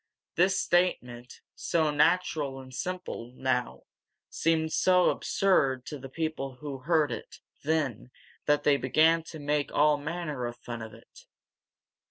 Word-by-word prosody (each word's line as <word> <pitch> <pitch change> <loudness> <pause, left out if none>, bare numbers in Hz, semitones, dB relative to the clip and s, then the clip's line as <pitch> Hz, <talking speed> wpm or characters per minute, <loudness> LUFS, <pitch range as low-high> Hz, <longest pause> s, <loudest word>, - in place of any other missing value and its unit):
This 185 +2 +3
statement, 125 -9 0
so 160 -3 0
natural 150 -3 +1
and 130 -1 -12
simple 180 -7 -5
now, 130 -2 -1 0.5
seemed 160 -1 0
so 180 -1 +4
absurd 135 -10 +1
to 150 - -7
the 135 +1 -9
people 145 -3 -3
who 135 +1 -7
heard 150 0 +2
it 115 - -7 0.2
then 145 -7 -1 0.4
that 150 0 +3
they 145 -1 +4
began 160 +5 +3
to 160 - -9
make 145 -1 -1
all 150 0 +4
manner 150 -4 -4
of 120 0 -7
fun 120 -1 -7
of 110 -1 -8
it. 115 - -18
150 Hz, 140 wpm, -28 LUFS, 130-165 Hz, 0.5 s, so